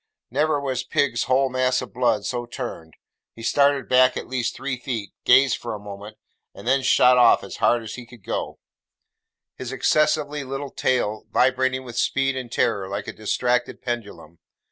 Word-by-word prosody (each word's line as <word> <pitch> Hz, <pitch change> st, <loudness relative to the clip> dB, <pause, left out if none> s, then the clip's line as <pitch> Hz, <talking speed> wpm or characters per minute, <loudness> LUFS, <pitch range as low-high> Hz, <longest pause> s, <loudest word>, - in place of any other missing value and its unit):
Never 150 Hz, +3 st, +1 dB
was 130 Hz, -3 st, -2 dB
pig's 125 Hz, -3 st, 0 dB
whole 130 Hz, +2 st, +2 dB
mass 130 Hz, 0 st, +1 dB
of -, -, -8 dB
blood 120 Hz, -4 st, +1 dB
so 120 Hz, -1 st, -3 dB
turned. 115 Hz, -, -7 dB, 0.4 s
He 115 Hz, -, -11 dB
started 140 Hz, +2 st, +2 dB
back 130 Hz, 0 st, +4 dB
at -, -, -5 dB
least 125 Hz, -2 st, -2 dB
three 135 Hz, -1 st, -3 dB
feet, 120 Hz, -5 st, -5 dB
gazed 130 Hz, +1 st, +5 dB
for 115 Hz, -2 st, -5 dB
a -, -, -8 dB
moment, 105 Hz, +1 st, -10 dB, 0.4 s
and -, -, -10 dB
then 135 Hz, +2 st, +3 dB
shot 125 Hz, -1 st, +5 dB
off 120 Hz, -1 st, +5 dB
as 100 Hz, -, -8 dB
hard 120 Hz, -1 st, +2 dB
as 110 Hz, -, -7 dB
he 125 Hz, -1 st, -9 dB
could 120 Hz, -4 st, -16 dB
go: -, -, -4 dB, 1.0 s
his -, -, -6 dB
excessively 150 Hz, -1 st, +1 dB
little 135 Hz, +1 st, -5 dB
tail 110 Hz, -4 st, -1 dB
vibrating 130 Hz, +1 st, +1 dB
with 120 Hz, -2 st, -9 dB
speed 135 Hz, 0 st, +1 dB
and 125 Hz, -3 st, -6 dB
terror 95 Hz, -5 st, 0 dB
like 100 Hz, +1 st, -4 dB
a -, -, -5 dB
distracted 125 Hz, +3 st, -1 dB
pendulum. 105 Hz, -9 st, -6 dB
125 Hz, 175 wpm, -23 LUFS, 115-130 Hz, 1.0 s, gazed